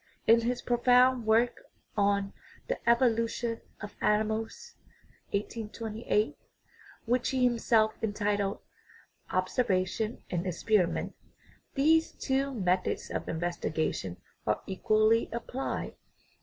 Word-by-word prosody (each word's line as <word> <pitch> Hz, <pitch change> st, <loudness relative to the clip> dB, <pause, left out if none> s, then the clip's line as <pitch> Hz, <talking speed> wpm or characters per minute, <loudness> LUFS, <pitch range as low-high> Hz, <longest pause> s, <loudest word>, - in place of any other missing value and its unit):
In 230 Hz, +1 st, +6 dB
his 240 Hz, +1 st, -2 dB
profound 250 Hz, 0 st, +4 dB
work 230 Hz, +2 st, +3 dB, 0.3 s
on 200 Hz, -1 st, +1 dB, 0.3 s
"the -, -, -1 dB
evolution 230 Hz, -1 st, +2 dB, 0.2 s
of 205 Hz, -, -8 dB
animals" 220 Hz, -, 0 dB, 0.6 s
(1828), 215 Hz, +1 st, -2 dB, 0.7 s
which 245 Hz, +1 st, +1 dB
he 260 Hz, -1 st, +1 dB
himself 230 Hz, -2 st, +3 dB
entitled 205 Hz, -2 st, -1 dB, 0.7 s
Observation 190 Hz, +2 st, 0 dB
and 175 Hz, +1 st, -1 dB
Experiment, 180 Hz, +1 st, +1 dB, 0.6 s
these 320 Hz, +4 st, +3 dB
two 270 Hz, +1 st, -1 dB
methods 185 Hz, -6 st, -1 dB
of -, -, -3 dB
investigation 160 Hz, -, -2 dB, 0.3 s
are -, -, 0 dB
equally 215 Hz, +3 st, +2 dB
applied. 240 Hz, +3 st, -4 dB
220 Hz, 90 wpm, -30 LUFS, 200-245 Hz, 0.7 s, In